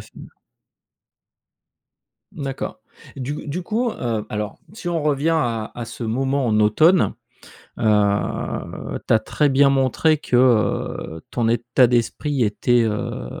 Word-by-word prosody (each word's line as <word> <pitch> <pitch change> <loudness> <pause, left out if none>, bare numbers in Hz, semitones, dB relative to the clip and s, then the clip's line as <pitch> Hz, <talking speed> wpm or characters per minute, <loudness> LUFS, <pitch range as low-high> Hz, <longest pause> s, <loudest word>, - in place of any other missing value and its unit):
fait - - -14 2.2
Mmh, 145 - -8
d'accord. 135 -1 -5 0.4
Du 135 +4 -5
du 175 +5 -3
coup, 230 +6 -1
heu, 115 - -3
alors 105 0 -4
si 210 -4 -6
on 170 -2 -1
revient 150 +2 +1
à, 115 -8 -1
à 120 - -5
ce 115 +1 -7
moment 135 +4 0
en 110 -2 +2
automne. 155 - +4 0.6
Heu, 105 -2 0
tu - - +5
as 110 - +6
très 145 +6 0
bien 140 +1 +4
montré 135 +3 +2
que, 125 - -1
heu, 110 -9 +1
ton 115 -2 0
état 120 +2 +3
d'esprit 125 +3 0
était, 120 +3 +2
heu, 105 - -4
125 Hz, 135 wpm, -21 LUFS, 110-145 Hz, 2.2 s, as